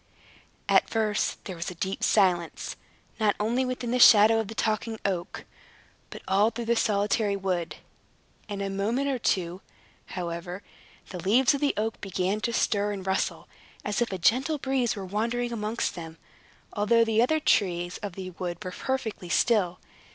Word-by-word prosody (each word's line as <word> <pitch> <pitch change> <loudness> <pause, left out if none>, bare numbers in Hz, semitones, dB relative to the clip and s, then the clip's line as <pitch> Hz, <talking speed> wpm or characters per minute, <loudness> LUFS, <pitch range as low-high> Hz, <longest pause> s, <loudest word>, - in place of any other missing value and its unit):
At - - +4
first 215 -2 -1
there 185 - -5
was 170 0 -4
a 180 - -8
deep 190 +3 -3
silence, 180 -5 +1 0.4
not 215 -2 +2
only 235 +5 +1
within 250 -2 -3
the 250 - +1
shadow 225 -1 +8
of 220 - -2
the 225 - -8
Talking 220 0 -1
Oak, 185 -3 -3 0.6
but - - -10
all 200 +3 +4
through 235 0 -6
the 235 +1 +2
solitary 205 -1 +1
wood. 185 -4 -2 0.7
In 200 -1 -4
a 195 - -2
moment 225 +8 0
or 260 -2 -1
two, 180 -3 -1 0.5
however, 175 +1 -5 0.5
the 180 - -6
leaves 240 - +4
of 280 - -3
the 290 - +1
oak 220 +1 -2
began 195 +2 -1
to 235 - -1
stir 205 -2 +1
and 190 -2 -6
rustle, 190 0 -1 0.4
as 210 +2 -1
if 235 - 0
a 190 - -2
gentle 260 - +2
breeze 265 -4 0
were 195 -2 -6
wandering 235 +5 -1
amongst 220 +1 -2
them, 165 -2 -8 0.6
although 230 +3 +3
the 225 0 +2
other 315 +6 +2
trees 175 - +1
of 205 -3 -5
the 185 0 -7
wood 175 -1 -5
were 185 - -4
perfectly 225 -5 -3
still. 185 -3 +2
210 Hz, 170 wpm, -27 LUFS, 185-230 Hz, 0.7 s, shadow